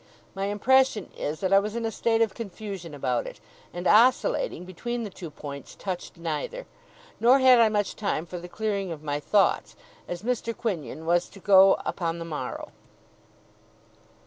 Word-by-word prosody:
My 195 Hz, 0 st, -3 dB
impression 220 Hz, +1 st, +2 dB
is, 150 Hz, +2 st, -4 dB
that 190 Hz, 0 st, +1 dB
I 195 Hz, -, +8 dB
was 210 Hz, +2 st, -4 dB
in 235 Hz, -1 st, -2 dB
a 225 Hz, -, -1 dB
state 225 Hz, 0 st, +2 dB
of 215 Hz, -4 st, -2 dB
confusion 195 Hz, -7 st, -7 dB
about 125 Hz, -3 st, -1 dB
it, -, -, -9 dB, 0.3 s
and, 175 Hz, +1 st, -6 dB
oscillating 255 Hz, -, +3 dB
between 240 Hz, +6 st, -4 dB
the 210 Hz, -, -6 dB
two 175 Hz, -2 st, -8 dB
points, 140 Hz, -2 st, -9 dB
touched 185 Hz, -2 st, -6 dB
neither. 170 Hz, -, -4 dB, 0.5 s
Nor 245 Hz, +4 st, +6 dB
had 260 Hz, -2 st, +6 dB
I 225 Hz, -1 st, +6 dB
much 205 Hz, -1 st, -1 dB
time 195 Hz, -6 st, -2 dB
for 180 Hz, +1 st, -7 dB
the 175 Hz, +1 st, -10 dB
clearing 200 Hz, -3 st, -2 dB
of 155 Hz, -2 st, -7 dB
my 145 Hz, -1 st, -2 dB
thoughts, 200 Hz, +6 st, +1 dB, 0.3 s
as 175 Hz, +2 st, -5 dB
Mr. 230 Hz, -1 st, -2 dB
Quinion 160 Hz, -, -4 dB
was 175 Hz, +1 st, +2 dB
to 200 Hz, -, -14 dB
go 195 Hz, 0 st, +7 dB
upon 170 Hz, -2 st, -2 dB
the 165 Hz, -, -6 dB
morrow. 150 Hz, -6 st, -5 dB
195 Hz, 170 wpm, -26 LUFS, 170-225 Hz, 0.5 s, I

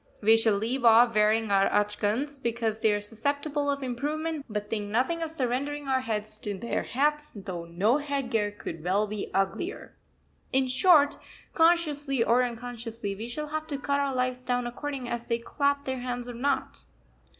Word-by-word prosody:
We 220 Hz, +2 st, +5 dB
shall 225 Hz, -2 st, +3 dB
leave 240 Hz, +5 st, -1 dB
off 230 Hz, +1 st, +6 dB
wearing 215 Hz, 0 st, +3 dB
our 195 Hz, 0 st, +4 dB
achgans 210 Hz, +7 st, 0 dB
because 230 Hz, -2 st, -1 dB
they 220 Hz, -, +3 dB
are 205 Hz, 0 st, 0 dB
susceptible 285 Hz, +7 st, -1 dB
of 280 Hz, -1 st, -1 dB
improvement, 295 Hz, +4 st, -3 dB
but 210 Hz, -1 st, -3 dB
think 210 Hz, -1 st, -3 dB
nothing 260 Hz, +10 st, 0 dB
of 325 Hz, -, -2 dB
surrendering 285 Hz, 0 st, -2 dB
our 260 Hz, -1 st, +2 dB
heads 215 Hz, -2 st, -3 dB
to 205 Hz, -2 st, -4 dB
their 235 Hz, +5 st, -2 dB
hats, 295 Hz, +3 st, 0 dB
though 185 Hz, -4 st, -6 dB
no 195 Hz, +10 st, +2 dB
headgear 265 Hz, -7 st, -1 dB
could 205 Hz, -6 st, -8 dB
well 195 Hz, +4 st, +2 dB
be 210 Hz, -1 st, -5 dB
uglier. 195 Hz, -, -2 dB, 0.6 s
In 265 Hz, 0 st, +3 dB
short, 290 Hz, +2 st, +5 dB, 0.4 s
consciously 300 Hz, -6 st, +3 dB
or 235 Hz, +2 st, +4 dB
unconsciously, 235 Hz, -3 st, -4 dB
we 220 Hz, +4 st, -6 dB
shall 300 Hz, +5 st, -4 dB
have 310 Hz, 0 st, -3 dB
to 285 Hz, -, -3 dB
cut 280 Hz, 0 st, 0 dB
our 280 Hz, -2 st, 0 dB
lives 255 Hz, 0 st, -1 dB
down 245 Hz, -1 st, 0 dB
according 260 Hz, +1 st, -5 dB
as 235 Hz, 0 st, -4 dB
they 230 Hz, -, +1 dB
clap 280 Hz, +4 st, 0 dB
their 260 Hz, -1 st, -3 dB
hands 245 Hz, 0 st, -4 dB
or 245 Hz, -, -6 dB
not. 265 Hz, +3 st, -1 dB
245 Hz, 175 wpm, -28 LUFS, 215-285 Hz, 0.6 s, off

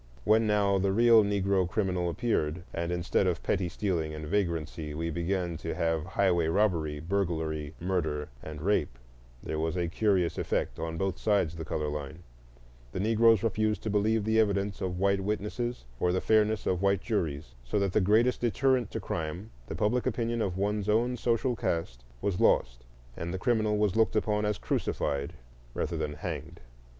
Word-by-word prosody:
When, 110 Hz, +1 st, +4 dB
now, 100 Hz, -2 st, +3 dB
the 95 Hz, +1 st, +1 dB
real 115 Hz, +1 st, +6 dB
Negro 100 Hz, -2 st, +1 dB
criminal 90 Hz, -4 st, 0 dB
appeared, 85 Hz, -5 st, -1 dB
and 85 Hz, 0 st, -2 dB
instead 90 Hz, +2 st, +1 dB
of 85 Hz, -3 st, -1 dB
petty 95 Hz, -3 st, 0 dB
stealing 85 Hz, -5 st, -2 dB
and 75 Hz, 0 st, -6 dB
vagrancy 80 Hz, -4 st, -2 dB
we 85 Hz, +1 st, -2 dB
began 85 Hz, 0 st, -1 dB
to 80 Hz, 0 st, -4 dB
have 80 Hz, -2 st, 0 dB
highway 90 Hz, -4 st, +2 dB
robbery, 80 Hz, -5 st, +1 dB
burglary, 80 Hz, -4 st, -2 dB
murder, 80 Hz, -5 st, -1 dB
and 75 Hz, -1 st, -8 dB
rape, 85 Hz, -11 st, +1 dB, 0.5 s
there 75 Hz, -, -3 dB
was 80 Hz, +3 st, -1 dB
a 85 Hz, -1 st, 0 dB
curious 90 Hz, -2 st, +1 dB
effect -, -, -1 dB
on 80 Hz, 0 st, -3 dB
both 95 Hz, 0 st, -2 dB
sides 100 Hz, -7 st, +1 dB
the 80 Hz, 0 st, -6 dB
color 75 Hz, -1 st, -2 dB
line: 75 Hz, +3 st, -5 dB, 0.7 s
the -, -, -3 dB
Negroes 115 Hz, +1 st, +4 dB
refused 110 Hz, 0 st, 0 dB
to 110 Hz, -, -2 dB
believe 105 Hz, +1 st, +2 dB
the 110 Hz, 0 st, +3 dB
evidence 100 Hz, -2 st, +1 dB
of 90 Hz, -1 st, -2 dB
white 100 Hz, +1 st, +2 dB
witnesses 105 Hz, -, -3 dB
or 90 Hz, -, +2 dB
the 95 Hz, -, +1 dB
fairness 110 Hz, 0 st, +2 dB
of 90 Hz, -1 st, 0 dB
white 100 Hz, -1 st, +2 dB
juries, 80 Hz, -, -2 dB
so -, -, -2 dB
that 100 Hz, -2 st, 0 dB
the -, -, +3 dB
greatest 110 Hz, +6 st, +3 dB
deterrent 125 Hz, 0 st, +2 dB
to -, -, -4 dB
crime, 85 Hz, +6 st, -4 dB, 0.2 s
the -, -, -5 dB
public 105 Hz, +7 st, +1 dB
opinion 115 Hz, -1 st, -1 dB
of 95 Hz, -4 st, -1 dB
one's 105 Hz, +1 st, -1 dB
own 120 Hz, +4 st, +2 dB
social 120 Hz, +1 st, 0 dB
caste, 80 Hz, -, -2 dB, 0.2 s
was 100 Hz, -3 st, 0 dB
lost, -, -, +2 dB, 0.3 s
and 85 Hz, +1 st, -4 dB
the 95 Hz, -, -2 dB
criminal 110 Hz, -1 st, +1 dB
was 105 Hz, -3 st, +1 dB
looked 110 Hz, 0 st, +3 dB
upon 105 Hz, -1 st, +1 dB
as 105 Hz, -1 st, 0 dB
crucified 70 Hz, -2 st, -2 dB, 0.4 s
rather -, -, -2 dB
than 75 Hz, -, -2 dB
hanged. 80 Hz, +1 st, -6 dB
95 Hz, 175 wpm, -29 LUFS, 80-105 Hz, 0.7 s, real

